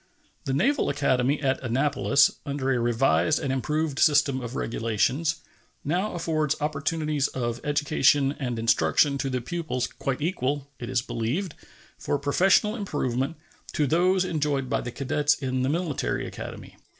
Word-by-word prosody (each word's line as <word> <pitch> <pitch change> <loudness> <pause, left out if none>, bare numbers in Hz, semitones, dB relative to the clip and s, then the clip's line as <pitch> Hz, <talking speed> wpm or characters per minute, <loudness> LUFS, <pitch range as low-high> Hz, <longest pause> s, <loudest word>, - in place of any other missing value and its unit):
The 135 - -1
Naval 280 - +2
Academy 135 0 +1
at 135 -1 +1
Annapolis, 140 +2 +2
under 140 -1 -2
a 125 - 0
revised 115 -8 +2
and 135 -2 -2
improved 150 +2 -1
system 145 -3 +3
of 120 +1 -6
regulations, 115 +8 0 0.5
now 180 +7 -1
affords 155 -3 0
opportunities 150 0 -1
of 120 -2 -3
education 145 -1 +2
and 125 -4 -3
instruction 140 +5 +2
to 135 - -1
the 130 -1 -2
pupils 155 -4 -3
quite 135 -1 -4
equal, 145 -4 -2
it 120 - -6
is 125 -2 0
believed, 140 - -2 0.5
for - - -1
professional 190 +9 +3
improvement, 145 - -2 0.4
to 150 - +1
those 180 +5 +2
enjoyed 145 -6 -1
by - - +1
the 120 - -5
cadets 145 +3 +1
in 130 -2 -2
the 130 - +1
Military 165 -2 -1
Academy. - - -8
140 Hz, 145 wpm, -26 LUFS, 130-155 Hz, 0.5 s, system